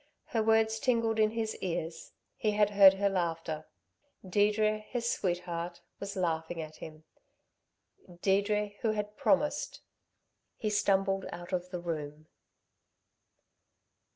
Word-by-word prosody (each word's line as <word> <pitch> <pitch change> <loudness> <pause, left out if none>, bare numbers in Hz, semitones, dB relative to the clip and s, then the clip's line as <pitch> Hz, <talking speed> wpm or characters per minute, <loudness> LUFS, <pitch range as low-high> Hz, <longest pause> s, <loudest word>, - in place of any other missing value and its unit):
Her 225 - +1
words 220 0 +3
tingled 230 -3 +1
in 215 0 +5
his 220 0 -2
ears; 165 -2 -4 0.2
he 215 -1 0
had 205 0 +3
heard 195 -1 +8
her 200 +1 +1
laughter 165 -4 -2 0.6
Deirdre, 210 +2 +2
his 235 +2 -4
sweetheart, 175 -3 -2 0.2
was 200 0 -5
laughing 165 -2 -1
at 155 -1 -7
him 155 0 -10 1.2
Deirdre 205 +1 +2
who 225 -3 +1
had 210 0 -4
promised 295 +1 +1 0.8
He 215 - -2
stumbled 195 -2 +2
out 175 +2 -8
of 180 0 -1
the 180 -1 -4
room. 155 -3 -5
195 Hz, 120 wpm, -31 LUFS, 175-215 Hz, 1.2 s, heard